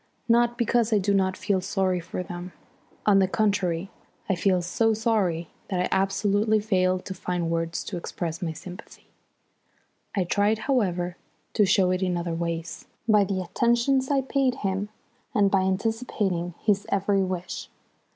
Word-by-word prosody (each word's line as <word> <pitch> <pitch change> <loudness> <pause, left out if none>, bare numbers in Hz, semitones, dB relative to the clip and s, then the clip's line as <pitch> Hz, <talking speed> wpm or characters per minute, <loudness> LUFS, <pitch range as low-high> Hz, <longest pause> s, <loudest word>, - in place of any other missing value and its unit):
Not 240 0 +3
because 235 -1 +2
I 215 - +4
do 200 0 +1
not 190 -1 +1
feel 200 -2 0
sorry 185 -1 0
for 175 +1 -5
them; 175 +1 -7 0.5
on 200 -2 +5
the 190 - +4
contrary, 195 -4 0 0.4
I - - +2
feel 185 0 +2
so 220 +5 +2
sorry 200 -7 0 0.2
that 185 -3 -2
I 180 - +1
absolutely 205 +2 +2
fail 185 -3 +2
to 185 +1 -7
find 175 -2 -2
words 165 0 -1
to 185 - -5
express 170 0 -4
my 170 -3 -1
sympathy. 180 +5 -11 1.1
I 195 - +2
tried, 205 +4 +2
however, 180 -9 0 0.4
to 210 -3 +4
show 185 -1 +4
it 185 0 0
in 180 -2 0
other 170 -1 -2
ways, 170 0 -4 0.2
by 210 -2 +5
the 190 -1 -2
attentions 240 +7 +2
I 280 -2 +3
paid 265 -1 +1
him 195 +2 -1 0.5
and 200 -2 +4
by 195 - +4
anticipating 190 -3 -1
his 205 -2 +1
every 200 0 +2
wish. 185 -1 -4
190 Hz, 160 wpm, -26 LUFS, 180-215 Hz, 1.1 s, on